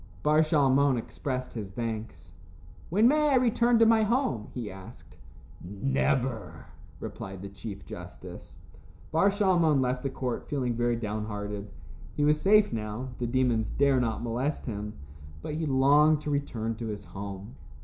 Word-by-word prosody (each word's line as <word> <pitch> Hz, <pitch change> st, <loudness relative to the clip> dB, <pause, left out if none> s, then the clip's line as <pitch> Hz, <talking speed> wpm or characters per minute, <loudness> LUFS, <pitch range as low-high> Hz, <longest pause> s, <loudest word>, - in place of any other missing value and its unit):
Bar 150 Hz, +1 st, +4 dB
Shalmon 140 Hz, -3 st, +3 dB
expressed 130 Hz, +2 st, -4 dB
his 105 Hz, -5 st, -5 dB
thanks. 110 Hz, +1 st, -5 dB, 0.6 s
"When 210 Hz, +7 st, +4 dB
may 300 Hz, +2 st, +4 dB
I 275 Hz, -, +4 dB
return 240 Hz, -1 st, +3 dB
to 230 Hz, -, +6 dB
my 225 Hz, 0 st, +5 dB
home?" 230 Hz, -, 0 dB
he 120 Hz, -5 st, -5 dB
asked. 95 Hz, 0 st, -13 dB, 0.5 s
"Never," 100 Hz, -, -1 dB, 0.3 s
replied 95 Hz, -1 st, -7 dB
the 100 Hz, -, -6 dB
chief 100 Hz, -1 st, -8 dB
justice. -, -, -10 dB, 0.5 s
Bar 165 Hz, +5 st, +4 dB
Shalmon 180 Hz, -7 st, +3 dB
left 125 Hz, -1 st, 0 dB
the 135 Hz, -, -2 dB
court, 130 Hz, -2 st, -4 dB
feeling 130 Hz, -4 st, -1 dB
very 120 Hz, +1 st, +1 dB
downhearted. 105 Hz, -2 st, -4 dB, 0.5 s
He 145 Hz, -, +2 dB
was 150 Hz, 0 st, +3 dB
safe 210 Hz, -, +5 dB
now. 110 Hz, +3 st, -4 dB
The 120 Hz, -, -1 dB
demons 120 Hz, -3 st, +1 dB
dared 140 Hz, -2 st, +3 dB
not 115 Hz, -2 st, -2 dB
molest 125 Hz, +6 st, -2 dB
him, 105 Hz, -2 st, -4 dB, 0.5 s
but -, -, -4 dB
he 160 Hz, +1 st, -2 dB
longed 145 Hz, +3 st, +5 dB
to 150 Hz, -, -3 dB
return 120 Hz, -6 st, -2 dB
to 115 Hz, 0 st, -5 dB
his 105 Hz, -1 st, -5 dB
home. 100 Hz, +4 st, -7 dB
125 Hz, 150 wpm, -28 LUFS, 105-150 Hz, 0.6 s, to